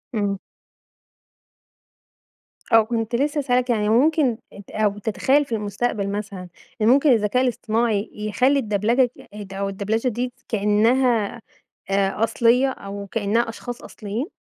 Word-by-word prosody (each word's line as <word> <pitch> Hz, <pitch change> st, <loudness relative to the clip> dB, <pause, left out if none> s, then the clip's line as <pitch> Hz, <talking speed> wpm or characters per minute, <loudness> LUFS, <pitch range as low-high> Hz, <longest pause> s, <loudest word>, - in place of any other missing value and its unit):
إمم. 200 Hz, -2 st, 0 dB, 2.3 s
آه 225 Hz, -, +8 dB
وكنت 225 Hz, +1 st, -1 dB
لسه 290 Hz, +4 st, 0 dB
هاسألك، 250 Hz, -2 st, +1 dB
يعني 210 Hz, -3 st, +1 dB
ممكن 265 Hz, +1 st, +3 dB, 0.2 s
أنت 200 Hz, -1 st, -13 dB
أو 210 Hz, -2 st, 0 dB
تتخيل 265 Hz, +7 st, +1 dB
في 235 Hz, -, -3 dB
المستقبل 205 Hz, 0 st, -2 dB
مثلًا، 200 Hz, -3 st, -5 dB, 0.3 s
إن 215 Hz, -, +3 dB
ممكن 275 Hz, +5 st, +5 dB
الذكاء 225 Hz, +2 st, +2 dB
الاصطناعي 230 Hz, -3 st, 0 dB
يخلّي 250 Hz, +7 st, +1 dB
الدبلجة 230 Hz, +3 st, +2 dB, 0.4 s
أو 195 Hz, 0 st, -2 dB
الدبلچة 210 Hz, +5 st, -1 dB
دي 245 Hz, +1 st, -2 dB, 0.2 s
كأنها 225 Hz, +2 st, +2 dB, 0.5 s
آآ 195 Hz, +2 st, +1 dB
أصلية 235 Hz, +3 st, +3 dB
أو 200 Hz, -5 st, -7 dB
كأنها 225 Hz, +3 st, 0 dB
أشخاص 240 Hz, +1 st, -7 dB
أصليين؟ 220 Hz, +7 st, -5 dB
225 Hz, 120 wpm, -22 LUFS, 205-250 Hz, 2.3 s, آه